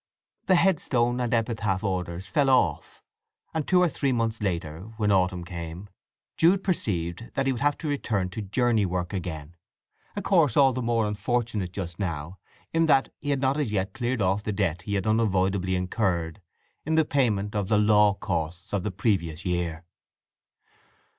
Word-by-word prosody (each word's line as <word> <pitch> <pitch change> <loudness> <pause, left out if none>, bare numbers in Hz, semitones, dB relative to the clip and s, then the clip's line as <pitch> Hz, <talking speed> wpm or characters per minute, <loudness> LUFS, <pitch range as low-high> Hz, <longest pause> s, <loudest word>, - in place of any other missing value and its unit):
The 185 - +5
headstone 125 -10 +2
and 120 -1 -1
epitaph 110 -5 0
orders 90 -2 -3
fell 135 +9 +1
off: 130 - +1 0.5
and 160 -2 -2
two 180 -1 +4
or - - +4
three 140 -3 -1
months 115 -2 -1
later, 85 -5 -2 0.2
when 105 -2 +1
autumn 90 -2 +2
came, 85 +2 -7 0.5
Jude 185 +4 +4
perceived 95 - -2
that 135 - 0
he 135 - +2
would 120 -2 -4
have 145 0 +2
to 160 - -5
return 110 -10 -1
to 100 +4 -5
journey 110 +2 +1
work 90 0 -2
again, 85 -4 -5 0.6
a 205 - -2
course 165 - +3
all 135 -2 +6
the 130 - -2
more 115 -2 +1
unfortunate 105 -2 -1
just 90 -3 -6
now, 85 -1 -4 0.3
in 165 0 +3
that 135 -3 +3
he 145 - -5
had 140 -2 +1
not 135 +2 +1
as 135 -8 -1
yet 95 -1 -1
cleared 120 -3 -1
off 95 +2 +1
the 105 - -3
debt 95 -4 -1
he 100 +1 -3
had 95 - -1
unavoidably 95 -4 +1
incurred 90 -1 -1 0.4
in 160 +1 0
the 160 -1 +4
payment 105 -8 0
of 100 -2 -1
the 105 0 +3
law 105 -1 +4
costs 90 +1 -4
of 100 - +1
the 105 - -2
previous 90 -5 -1
year. 85 -2 -2
105 Hz, 175 wpm, -26 LUFS, 90-125 Hz, 0.6 s, all